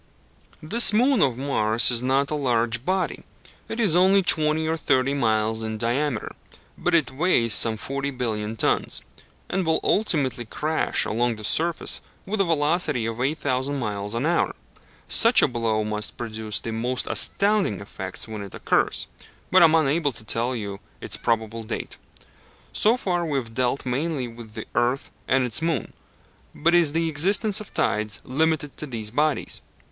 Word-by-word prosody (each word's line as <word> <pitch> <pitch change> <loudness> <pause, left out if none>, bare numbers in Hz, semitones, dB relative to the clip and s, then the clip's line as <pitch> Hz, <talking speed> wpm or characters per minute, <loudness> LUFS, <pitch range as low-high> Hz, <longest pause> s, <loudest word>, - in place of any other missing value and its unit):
This 230 +10 +6
moon 245 +2 +3
of 130 -4 +2
Mars 120 -4 +2
is 120 -1 +3
not 135 +3 +1
a - - 0
large 120 -4 0
body: 185 +4 -1 0.5
it 225 - -5
is 200 -8 +3
only 190 +2 +5
twenty 155 -2 +2
or 160 - 0
thirty 135 -3 +1
miles 110 -4 0
in 110 0 -4
diameter, 120 +2 -1 0.4
but 175 - 0
it 155 -7 +2
weighs 130 - +2
some 110 +1 +4
forty 140 +6 -3
billion 110 -5 -3
tons, - - +1 0.4
and 190 +1 -1
will 160 -1 +1
ultimately 145 - +1
crash 155 +7 -1
along 120 +2 0
the 110 - -10
surface 165 +9 +1 0.2
with 205 +1 -1
a - - +2
velocity 155 -6 0
of 115 +1 -4
8,000 140 -1 -1
miles 105 -3 -4
an 120 +5 -1
hour. 170 +1 +1 0.5
Such 230 +2 +5
a - - +6
blow 115 -4 -1
must 105 0 -2
produce 110 -3 -4
the 115 - -5
most 120 +3 -2
astounding 200 - +1
effects - - -6
when 110 -2 -6
it 100 -1 -9
occurs, - - 0 0.5
but - - +6
I - - +9
am 160 0 +4
unable 150 -1 +1
to 110 - -9
tell 120 +3 +1
you 100 -3 -5 0.2
its - - -3
probable 115 0 -2
date. 110 - -6 0.8
So 225 +4 +3
far 180 -7 -1
we 150 -4 -1
have 115 -4 -5
dealt 130 +3 -1
mainly 135 +1 -2
with 115 -2 -12
the 110 - -6
earth 120 +3 0 0.2
and 130 0 +2
its 125 +3 +2
moon; 160 -7 -2 0.6
but 170 +3 +1
is 170 -4 +4
the 165 0 +1
existence 195 +7 +1
of 210 - -11
tides 105 -2 -1
limited 150 +1 -1
to 150 - -4
these 110 -5 -5
bodies? 150 +4 -1
130 Hz, 170 wpm, -24 LUFS, 115-160 Hz, 0.8 s, I